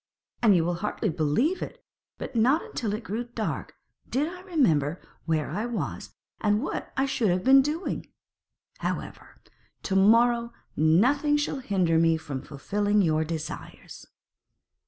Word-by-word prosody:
And 215 -5 +6
you 165 -2 +2
will 175 - 0
hardly 210 +1 -1
believe 165 - +1
it - - -7 0.3
but - - -7
not 255 +8 +3
until 220 -4 -4
it 220 - -7
grew 220 +5 -3
dark 235 -2 -4 0.3
did 285 +4 0
I 360 +2 -8
remember 180 - +1 0.3
where 155 -3 0
I 220 +3 -2
was 240 -2 -5 0.2
and 210 0 +2
what - - -4
I 270 - +3
should 245 -6 0
have 180 +1 +1
been 270 +1 +7
doing. 305 +6 -3 0.7
However, - - -5 0.4
to 190 - -1
morrow 235 +4 +4 0.2
nothing 255 - +3
shall 290 -1 -2
hinder 185 -9 +1
me 165 -1 +3
from 145 -4 -6
fulfilling 205 +9 0
your 160 -2 +2
desires.' 160 -1 -7
210 Hz, 145 wpm, -27 LUFS, 165-260 Hz, 0.7 s, been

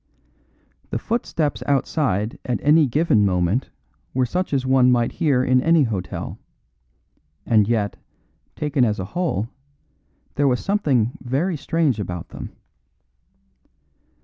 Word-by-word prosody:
The - - -2
footsteps 155 - -2
outside 125 - 0
at 125 - -1
any 150 +1 +5
given 130 -5 +2
moment 95 +5 +1 0.5
were 130 -1 +2
such 180 +9 -2
as 135 -2 0
one 130 -1 +4
might 120 -1 +2
hear 145 -7 +1
in 130 0 +3
any 165 +1 +4
hotel; 100 -7 -4 1.1
and 105 -3 +3
yet, 110 -3 0 0.6
taken 145 -3 0
as 110 -3 +1
a 95 - -3
whole, 160 - -1 0.8
there 145 0 +2
was 125 -2 +2
something 140 - +1
very 140 +9 -1
strange 150 -4 0
about 90 -4 -5
them. - - -8
130 Hz, 120 wpm, -22 LUFS, 110-150 Hz, 1.1 s, any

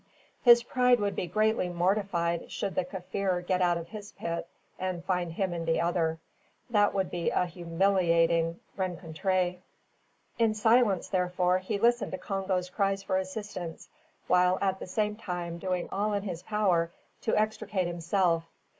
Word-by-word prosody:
His 240 -1 +7
pride 250 0 +3
would 205 -1 -1
be 180 - -2
greatly 215 +1 +1
mortified 175 -1 0
should 195 -2 -3
the 185 - +1
Kaffir 180 0 -2
get 185 0 +1
out 175 -1 +3
of 170 0 -7
his 210 -1 -9
pit, 170 0 -4 0.3
and 180 -2 -3
find 180 -3 0
him 190 0 -1
in 165 -1 -3
the 165 0 +1
other. 165 -2 +1 0.5
That 205 -3 +3
would 190 -2 0
be 175 -1 0
a 180 - +1
humiliating 170 -1 +2 0.2
rencontre. 180 0 -1 0.8
In 225 -2 +3
silence, 220 -3 +3
therefore, 180 0 +1
he 195 +3 -2
listened 235 +1 +2
to - - -1
Congo's 190 -2 -2
cries 195 0 0
for 190 -1 0
assistance, 185 -3 -6 0.4
while 180 0 +4
at 190 -1 0
the - - -7
same 210 +2 -1
time 175 -5 -4
doing 180 -1 -2
all 205 +2 0
in 200 -1 -1
his 180 -4 -5
power 185 -5 +1 0.3
to 220 - +1
extricate 215 -3 0
himself. 170 0 +1
185 Hz, 155 wpm, -29 LUFS, 175-205 Hz, 0.8 s, His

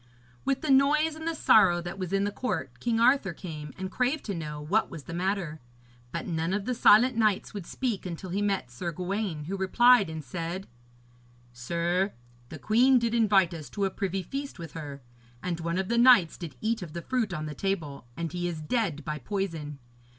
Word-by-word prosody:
With 270 -1 0
the 310 - 0
noise 300 +4 +4
and 315 +1 -7
the 330 - -1
sorrow 190 - +5
that 175 +3 -6
was 185 -1 -4
in 195 0 +2
the 205 - 0
court, 250 +5 -4
King 230 -2 0
Arthur 235 -6 +4
came 155 -5 -7
and 190 0 -5
craved 255 +7 0
to 205 - -3
know 150 -3 -5
what 180 +9 +1
was 160 -4 -8
the 165 - -8
matter; 175 -3 -2 0.5
but - - -4
none 165 +1 -1
of 205 0 -1
the 250 - 0
silent 240 +2 +6
knights 215 -4 +1
would 200 -5 -6
speak 240 -7 -2
until 175 +1 -6
he 200 +3 -1
met 195 -11 -1
Sir 170 +8 -4
Gawaine, 180 -1 -3
who 185 +6 -4
replied, 205 +2 +5
and 160 -1 -6
said: 170 +6 -5 0.9
'Sir, 170 +10 -1 0.4
the 155 - -7
queen 245 - +4
did 235 -1 0
invite 200 -6 +4
us 155 -6 -8
to 200 +8 -1
a 190 - -1
privy 190 -1 -2
feast 275 +8 -5
with 165 -4 -8
her. 145 -4 -8 0.4
And 175 -2 -2
one 170 +1 -2
of 190 0 -1
the 235 +2 +1
knights 240 -10 +6
did 170 -4 -8
eat 225 0 0
of 165 -4 -7
the 170 - -5
fruit 245 -6 -1
on 155 -3 -3
the 150 - -5
table, 150 -8 -3
and 165 -2 -3
he 175 0 -2
is 170 -3 -4
dead 160 - -1
by 150 -1 -3
poison. 160 - -4
190 Hz, 210 wpm, -28 LUFS, 165-225 Hz, 0.9 s, silent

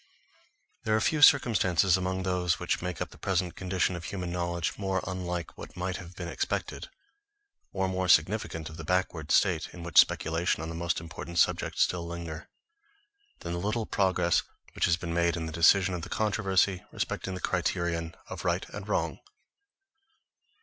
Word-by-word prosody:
THERE 110 - +2
ARE - - +3
few 155 -2 +1
circumstances 100 - +5
among 95 0 -1
those 90 -2 +1
which 90 - -1
make 90 -1 -4
up - - -12
the - - -15
present 90 -2 -1
condition 90 -1 0
of 85 - -7
human 90 -3 -4
knowledge, 85 -1 -2
more 95 -2 -1
unlike 90 -2 -4
what - - -10
might 90 +1 -2
have 90 -2 -10
been 85 - -5
expected, 85 - -3 0.8
or 95 - 0
more 95 0 -1
significant 80 -1 +2
of 80 - -9
the 80 - -7
backward 85 -2 -1
state 85 -6 +3
in 85 - -9
which 85 -2 +5
speculation 80 0 +2
on 80 - -5
the - - -5
most 85 +1 -1
important 85 +1 -8
subjects - - +2
still 85 -1 -2
lingers, 85 -1 -6 0.9
than 85 - -4
the 85 - -2
little 110 +4 -1
progress 90 -4 +2 0.3
which - - +1
has 85 -1 +3
been 85 -2 -4
made 85 0 +2
in 80 - -3
the 80 - -5
decision 90 +3 +4
of 90 - -3
the - - -7
controversy 100 -3 +1
respecting 95 - -3
the - - -5
criterion 85 -2 -1
of - - -7
right - - 0
and - - -8
wrong. - - -1
90 Hz, 175 wpm, -29 LUFS, 85-95 Hz, 0.9 s, circumstances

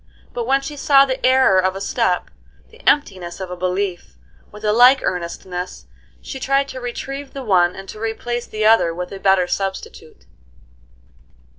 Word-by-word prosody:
But 235 -1 -4
when 270 +1 +2
she 290 +2 -7
saw 275 -1 +5
the 260 -1 -4
error 255 -7 +5
of 185 0 0
a - - -5
step, - - -1 0.4
the 460 +2 -17
emptiness 185 -12 -1
of 185 -1 -6
a - - -4
belief, 185 0 -3 0.4
with 210 +1 -9
a 210 - +2
like 250 +4 +6
earnestness 180 +1 -4 0.4
she 265 - -7
tried 275 +1 +1
to 260 - -7
retrieve 275 +3 -6
the 275 - -6
one 180 -5 +2
and 195 0 -10
to 215 - -9
replace 235 +2 -3
the 215 0 -2
other 215 -7 +4
with 180 +1 -5
a 195 - -7
better 190 -2 +3
substitute. 195 +1 -5
215 Hz, 170 wpm, -20 LUFS, 185-260 Hz, 0.4 s, like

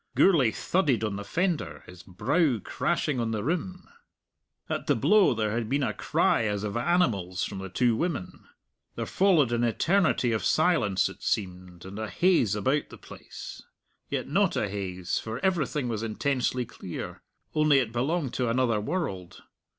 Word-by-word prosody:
Gourlay 155 -11 +5
thudded 140 -2 0
on 105 -2 -1
the 100 - -5
fender, 170 - -2
his 90 -1 -12
brow 135 - +1
crashing 130 +6 -1
on 115 -1 -1
the 110 -2 -2
rim. 180 +5 -3 0.8
At - - -3
the - - +3
blow 210 - +4
there 110 -1 0
had 115 0 -2
been 140 +2 +1
a - - 0
cry 115 - +1
as 105 -1 -1
of 105 -1 -3
animals 120 - +1
from 100 - -4
the 95 0 -6
two 120 +4 +2
women. 150 - -3 0.5
There - - -3
followed 175 -10 +3
an 120 0 +1
eternity 130 - +2
of 110 - -1
silence, 155 - +2
it - - -10
seemed, 90 -3 -3
and 100 +3 -8
a 110 -1 -4
haze 125 - +2
about 130 +8 0
the - - -11
place; - - -10 0.5
yet - - -2
not - - +2
a - - 0
haze, 95 -3 -3
for 110 +1 -5
everything 150 -7 0
was 110 -3 -2
intensely 125 +2 -1
clear; 90 -5 -7 0.3
only 155 -2 +4
it 125 -5 +1
belonged 135 +4 -1
to 125 -2 0
another 115 -3 +1
world. 100 - -4
120 Hz, 165 wpm, -27 LUFS, 105-155 Hz, 0.8 s, Gourlay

